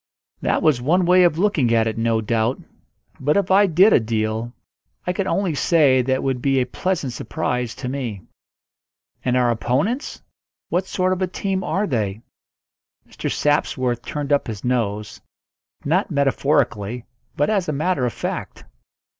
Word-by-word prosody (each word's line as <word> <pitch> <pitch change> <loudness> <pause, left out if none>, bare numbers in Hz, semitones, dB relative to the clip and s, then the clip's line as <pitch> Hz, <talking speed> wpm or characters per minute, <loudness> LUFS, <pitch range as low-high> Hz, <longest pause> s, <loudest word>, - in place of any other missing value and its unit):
That - - 0
was 150 -6 +3
one 175 +8 +2
way 180 +1 +5
of 170 -3 +2
looking 165 - +2
at 110 -1 +3
it, 110 -1 -2
no 115 0 +1
doubt; 115 +3 0 0.6
but 145 +5 +1
if 195 -2 0
I 200 +2 +6
did 185 +5 +5
a - - +6
deal, 110 +1 -2 0.5
I 180 - 0
could 190 +1 -2
only 185 -1 0
say 145 -4 +3
that 130 +2 -2
it 130 - 0
would 130 -2 -1
be 135 0 +2
a 125 - +1
pleasant 160 -3 -2
surprise 125 +1 -3
to 130 - -6
me. 125 -8 -4 1.0
"And 125 0 +1
our 120 -1 +3
opponents 135 - -1 0.5
what 180 +2 0
sort 185 -2 0
of 185 - -4
a 185 - +1
team 190 +1 -2
are 200 +2 0
they?" 110 - -2 0.8
Mr. - - -4
Sapsworth 130 -4 0
turned 145 +3 -3
up 145 - +1
his 110 -4 -6
nose 105 -4 -2 0.6
not 180 +8 +1
metaphorically, 135 - 0 0.3
but 145 +8 +2
as 195 -6 0
a - - +1
matter 155 0 0
of 120 - +1
fact. - - -5
135 Hz, 165 wpm, -21 LUFS, 120-180 Hz, 1.0 s, I